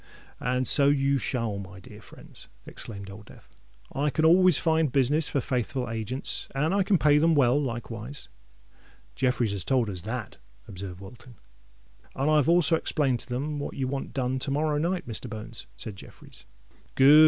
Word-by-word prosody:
"And 125 0 0
so 140 -1 +7
you 140 -1 +2
shall, 115 -5 -2
my 95 0 -9
dear 105 +3 -13
friends," - - -14 0.2
exclaimed 100 -3 -8
Old 105 +1 -12
Death. - - -16 0.5
"I 145 +2 +1
can 155 +3 0
always 180 0 +6
find 160 -3 +1
business 145 +4 +2
for 140 - 0
faithful 125 +1 -2
agents—and 130 - -2
I 200 - +3
can 190 0 +3
pay 150 -2 +4
them 165 +1 +3
well 140 0 +4
likewise." 120 0 -6 0.9
"Jeffreys 125 -4 0
has 100 -3 -2
told 125 -3 +1
us 90 -2 -4
that," 110 +2 -5 0.3
observed 95 -1 -8
Wilton. 120 +5 -13 0.8
"And 140 +3 +1
I've 150 -1 +3
also 170 -1 +4
explained 135 -6 0
to - - -9
them 145 +4 -3
what 145 - -5
you 130 -1 -2
want 135 +1 -4
done 130 -1 -1
to 130 - -3
morrow 150 +1 0
night, 175 +3 -1
Mr. 120 +1 -3
Bones," 110 +1 -8
said 105 -4 -7
Jeffreys. - - -14 0.5
"Good!" 140 +3 +8
130 Hz, 170 wpm, -27 LUFS, 115-150 Hz, 0.9 s, Good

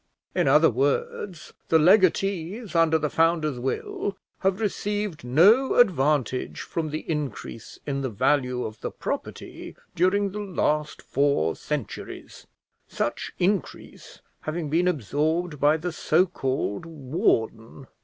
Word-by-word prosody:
In - - +1
other 150 +3 +5
words, 145 - -2 0.2
the 160 - +6
legatees 190 +3 +2
under 165 -1 +4
the 150 -1 -1
founder's 160 -4 +1
will 135 +9 -3 0.2
have 190 0 +1
received 205 - -2
no 195 - +5
advantage 145 - +2
from 160 -2 -3
the 155 +1 -5
increase 145 -7 -5
in 140 -1 -2
the 130 - -2
value 125 +2 +1
of 110 0 -8
the - - -3
property - - -6 0.2
during 195 +3 +2
the 210 - -5
last 155 -6 -1
four 140 - +1
centuries, 150 -7 -6 0.4
such - - -3
increase 190 +1 -3 0.2
having 155 -1 -4
been 175 +3 +2
absorbed 155 - -1
by 150 +2 +4
the 175 +3 -4
so 165 +2 +2
called 135 - -2
warden. 130 -5 -1
155 Hz, 125 wpm, -25 LUFS, 140-180 Hz, 0.4 s, the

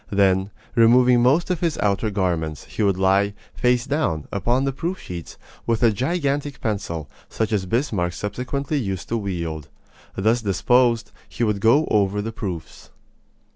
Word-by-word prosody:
Then, 95 -1 +2 0.2
removing 120 +1 +5
most 145 +9 +3
of 180 - -1
his 170 -3 0
outer 100 +2 +1
garments, 85 -7 -1
he - - -6
would 100 -3 +2
lie, 100 +2 +2 0.2
face 125 0 +1
down, 135 - -1
upon 120 +6 +1
the 135 - +1
proof 170 +8 -3
sheets, 85 -2 -8 0.3
with 115 0 +1
a 115 - +6
gigantic 145 - -1
pencil, 95 - -3 0.2
such 110 -1 -2
as 95 -3 0
Bismarck 100 - 0
subsequently 130 - -3
used 95 -7 -4
to 115 - 0
wield. 85 -7 -4 0.5
Thus 110 +5 +2
disposed, 115 +3 +2 0.2
he - - -3
would 105 -3 +1
go 130 +9 +4
over 100 -1 +2
the 110 +2 -3
proofs. 95 -7 -7
110 Hz, 155 wpm, -22 LUFS, 95-125 Hz, 0.5 s, a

